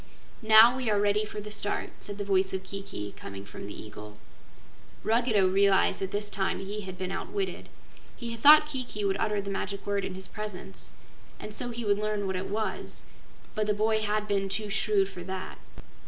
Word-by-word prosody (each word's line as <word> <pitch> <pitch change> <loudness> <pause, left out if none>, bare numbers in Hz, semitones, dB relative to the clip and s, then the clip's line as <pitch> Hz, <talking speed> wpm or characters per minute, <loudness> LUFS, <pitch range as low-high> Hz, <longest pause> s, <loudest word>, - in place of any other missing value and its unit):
"Now 220 +2 +8
we 255 -3 -1
are 205 -1 +3
ready 205 +1 +2
for 210 0 -6
the 210 0 -7
start," 205 -1 -1
said 205 -1 -4
the 205 - -3
voice 190 -1 +2
of 190 - -4
Kiki, 195 - -6
coming 100 0 -9
from 100 - -8
the 105 - -8
eagle. 105 0 -10 0.9
Ruggedo 225 -4 +3
realized 195 +1 +3
that 190 - -1
this 205 +1 -2
time 195 -2 -1
he 200 +2 -5
had 185 -2 -7
been 185 0 -3
outwitted. 385 - -4 0.5
He 235 -2 -5
had 230 - -5
thought 300 +5 +9
Kiki 255 -8 -4
would 195 0 +1
utter 210 -2 +1
the 200 0 -4
magic 200 0 -4
word 200 -1 0
in 185 - -4
his 190 0 -6
presence, 180 - -7 0.5
and 210 - -7
so 245 +3 -1
he 235 -1 -5
would 205 0 +2
learn 210 -1 -1
what 190 -1 -1
it 185 +1 -3
was, 215 +2 -3 0.5
but 215 -1 -1
the 210 - +2
boy 220 +1 +2
had 210 0 -1
been 195 -1 0
too 210 +1 -1
shrewd 200 -2 +2
for 190 -2 -9
that. 190 +1 -6
205 Hz, 200 wpm, -28 LUFS, 190-215 Hz, 0.9 s, thought